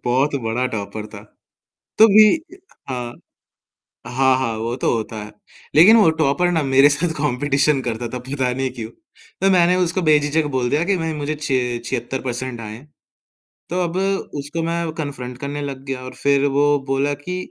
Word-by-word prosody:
बहुत 130 +4 +1
बड़ा 120 +3 0
टॉपर 105 -2 -5
था - - -11 0.8
तो 220 - +9
भी 215 +1 +7 0.6
हाँ, 125 -2 -4 0.9
हाँ, 130 +1 +2
हाँ, 115 -4 -2
वो 115 +2 -3
तो - - 0
होता 110 -1 -4
है 105 - -12 0.4
लेकिन 195 +9 +8
वो 210 -7 +5
टॉपर 155 +4 +2
ना 165 -2 +1
मेरे 135 +1 +5
साथ 160 +3 0
कॉम्पिटिशन 145 +1 +1
करता 120 -1 -3
था - - -3
पता 130 0 -2
नहीं 135 0 -2
क्यों 115 -3 -7 0.5
तो 195 - +4
मैंने 180 -1 +4
उसको 180 +2 -1
बेझिझक 155 0 +2
बोल 125 -1 0
दिया 150 +4 +1
कि 195 +1 +1
भाई 165 -1 -2
मुझे 150 0 -3
छि 130 -5 -1
76% 125 0 -4
आएँ, 110 +3 -8 0.9
तो 180 +2 -1
अब 170 +1 -4 0.4
उसको 150 +4 -4
मैं 165 0 -2
कन्फ्रेंट 135 -5 -5
करने 145 +2 -5
लग 135 -2 -6
गया 135 -2 -4
और 130 0 -8
फिर 140 0 +3
वो 145 0 +3
बोला 135 +2 +1
कि 165 +6 -6
140 Hz, 170 wpm, -20 LUFS, 125-155 Hz, 0.9 s, तो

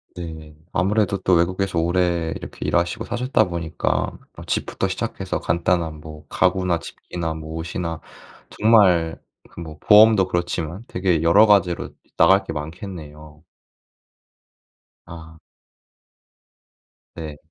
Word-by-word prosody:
네. 80 -3 -8 0.2
아무래도 100 +1 +1
또 95 0 +1
외국에서 90 +1 0
오래 85 -1 0
이렇게 - - -8
일하시고 85 +6 0
사셨다 125 +2 +1
보니까 85 -2 -2 0.2
어 - - -9
집부터 - - -1
시작해서 - - -3
간단한 85 -1 0
뭐 75 -1 -11
가구나 90 -2 +1
집기나 85 -1 -6
뭐 80 0 -8
옷이나 85 0 -4 0.5
정말 95 -7 +3 0.3
그 - - -12
뭐 80 -2 -9
보험도 105 -3 +6
그렇지만 85 +2 -3
되게 90 -4 0
여러 100 +6 +6
가지로 95 -5 +2 0.3
나갈 95 +1 +5
게 80 - -5
많겠네요. 75 -2 -9 1.6
아. 80 -2 -12 1.8
네. 75 -3 -7
85 Hz, 255 characters per minute, -22 LUFS, 80-95 Hz, 1.8 s, 보험도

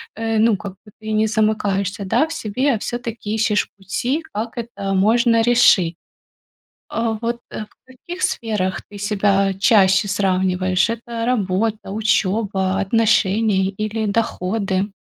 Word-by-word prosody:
э, 225 0 -1
ну, 220 -2 +3
как 195 0 -7
бы 210 - -17
ты 220 0 -6
не 215 +1 +2
замыкаешься, 205 -2 0
да, 305 +11 +1
в 325 - -6
себе, 260 +1 0
а - - -4
всё-таки 230 -3 -4
ищешь 210 -1 +1
пути, 245 - -2
как 225 +3 -4
это 210 -4 -4
можно 230 +4 +3
решить. 225 -8 +4 1.0
Э, 225 -1 0
вот 235 0 -2
в 215 - -6 0.2
каких 305 +8 -9
сферах 210 -5 -1
ты 205 - -12
себя 200 -1 +1
чаще 195 0 +4
сравниваешь: 185 0 +1
это 230 0 -4
работа, 215 -2 -1
учёба, 200 -2 0
отношения 210 -1 +2
или 215 +2 -3
доходы? 200 -2 -1
215 Hz, 130 wpm, -20 LUFS, 195-230 Hz, 1.0 s, решить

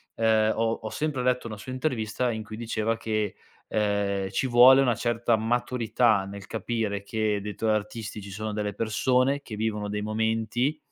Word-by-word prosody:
uhm, 110 -1 +3
ho 115 0 +1
ho 110 - -3
sempre 145 -3 -2
letto 125 -1 +1
una 110 -2 -6
sua 130 +5 -8
intervista 125 -3 -1
in 110 -1 -4
cui 110 +1 -9
diceva 115 -1 -1
che, 110 -2 -2 0.3
uhm, 100 -2 0
ci 115 +7 -1
vuole 130 +2 +8
una 120 -4 +2
certa 120 0 +1
maturità 115 -2 +1
nel 100 0 -9
capire 110 -3 -2
che 105 0 -1
dei 105 0 -5
tuoi 110 +1 0
artisti 105 0 -3
ci 100 - -9
sono 110 +2 -4
delle 105 -1 -2
persone 125 +6 +1
che 110 - -8
vivono 105 -1 -2
dei 105 0 -3
momenti, 110 +6 0
110 Hz, 175 wpm, -26 LUFS, 105-120 Hz, 0.3 s, vuole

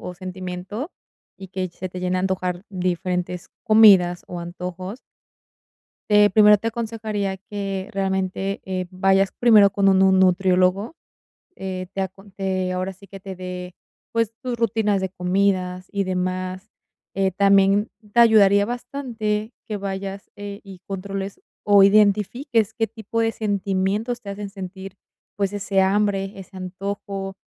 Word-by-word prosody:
o 180 - -7
sentimiento, 185 - -6 0.5
y 190 - -9
que 185 0 -3
se 180 +2 -7
te 180 0 -7
llene 180 0 0
a 185 - 0
antojar 185 0 -2
diferentes 180 -1 -2
comidas 195 -5 +6
o 175 -1 -6
antojos. 180 +5 -6 1.1
Eh, 210 0 +6
primero 210 +1 +6
te 225 +3 -2
aconsejaría 215 -4 -3
que 195 -1 -5
realmente, 190 0 -1
eh, 185 -1 -2
vayas 195 +1 +2
primero 215 -4 +6
con 195 0 +2
un 190 -1 +5
nu 190 0 +5
nutriólogo, 185 - +3 0.6
eh, 185 -1 -5
te 195 - -3
acon 195 +1 -6
te 190 -1 -2
ahora 185 +1 -2
sí 200 +2 -17
que 195 +1 -11
te 190 -1 -8
dé, 180 0 -7 0.4
pues, 230 -1 0
tus 250 -2 -3
rutinas 220 -3 +1
de 190 - -2
comidas 185 0 0
y 200 -1 0
demás. 185 0 -3 0.4
Eh, 195 0 +1
también 200 +2 +3 0.2
te 235 - +6
ayudaría 205 -3 +6
bastante 235 -3 -3 0.2
que 210 - -2
vayas, 195 0 -5
eh, 205 0 -7
y 195 -2 -11
controles 195 0 -5 0.2
o 205 -1 +6
identifiques 210 +3 +3
qué 225 -1 0
tipo 225 +1 -4
de 225 - +2
sentimientos 205 +3 -1
te 200 - -7
hacen 200 0 -5
sentir, 195 0 -8 0.4
pues, 200 0 0
ese 200 -1 +1
hambre, 195 0 +1
ese 190 0 -11
antojo, 195 +1 -5
195 Hz, 145 wpm, -22 LUFS, 185-205 Hz, 1.1 s, comidas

